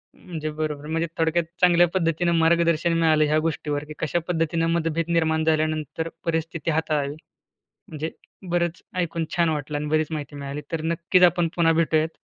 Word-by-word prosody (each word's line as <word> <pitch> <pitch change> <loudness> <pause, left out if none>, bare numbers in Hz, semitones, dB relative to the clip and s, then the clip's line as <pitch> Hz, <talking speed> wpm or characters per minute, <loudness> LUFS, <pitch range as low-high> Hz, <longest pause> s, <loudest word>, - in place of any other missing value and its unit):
म्हणजे 160 -4 -6
बरोबर. 150 -1 -4
म्हणजे 165 +1 -1
थोडक्यात 165 +1 +2 0.2
चांगल्या 175 -1 +6
पद्धतीनं 170 -1 +1
मार्गदर्शन 170 0 +3
मिळालं 155 -2 +4
ह्या 150 +1 +2
गोष्टीवर 150 -2 -2
की 155 - -8
कशा 160 +2 0
पद्धतीनं 165 -1 0
मतभेद 165 0 -1
निर्माण 160 -1 +2
झाल्यानंतर 155 0 0 0.2
परिस्थिती 165 -1 -1
हाताळावी. 150 -2 -1 0.7
म्हणजे 155 +1 -5 0.4
बरंच 175 -1 0 0.2
ऐकून 165 -2 -1
छान 170 -2 +3
वाटलं 150 -1 -2
आणि 150 +1 -3
बरीच 155 0 +2
माहिती 145 -2 -5
मिळाली. 140 +1 -5
तर 165 -1 -2
नक्कीच 170 +3 +2
आपण 175 -1 +4
पुन्हा 165 -1 +4
भेटूयात. 160 -1 +1
160 Hz, 155 wpm, -24 LUFS, 155-170 Hz, 0.7 s, चांगल्या